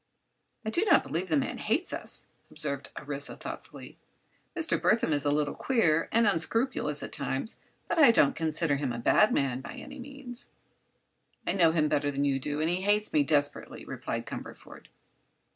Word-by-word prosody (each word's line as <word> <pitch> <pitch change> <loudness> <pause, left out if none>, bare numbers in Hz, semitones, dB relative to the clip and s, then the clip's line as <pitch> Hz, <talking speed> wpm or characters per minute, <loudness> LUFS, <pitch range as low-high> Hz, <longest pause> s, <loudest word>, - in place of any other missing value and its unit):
"I 220 - -1
do 345 - +2
not - - +5
believe 175 +3 -3
the 155 - +3
man 135 - -2
hates - - 0
us," - - -3 0.2
observed 140 -3 -4
Orissa, 145 0 -4
thoughtfully. - - -9 0.6
"Mr. 330 -1 0
Burthon 215 -8 +3
is 145 0 -1
a - - +3
little 145 0 0
queer 170 -12 +2
and—and 230 +1 +4
unscrupulous, 165 - 0
at - - -6
times; 135 - -3 0.3
but 340 - 0
I 285 - +8
don't 150 -11 +4
consider 160 -2 +1
him 140 -3 -2
a 120 - -4
bad 210 - +4
man, 130 -2 0
by - - -8
any 280 -1 -10
means." 255 -1 -9 1.0
"I - - +1
know 170 -4 +4
him 155 -2 +2
better 145 -1 +1
than 140 0 -1
you 135 -1 +1
do, 145 +2 -2
and 160 +1 +1
he 180 +1 -1
hates 210 +2 +1
me 150 - +4
desperately," 145 0 0
replied - - -4
Cumberford. - - -9
155 Hz, 175 wpm, -29 LUFS, 145-220 Hz, 1.0 s, I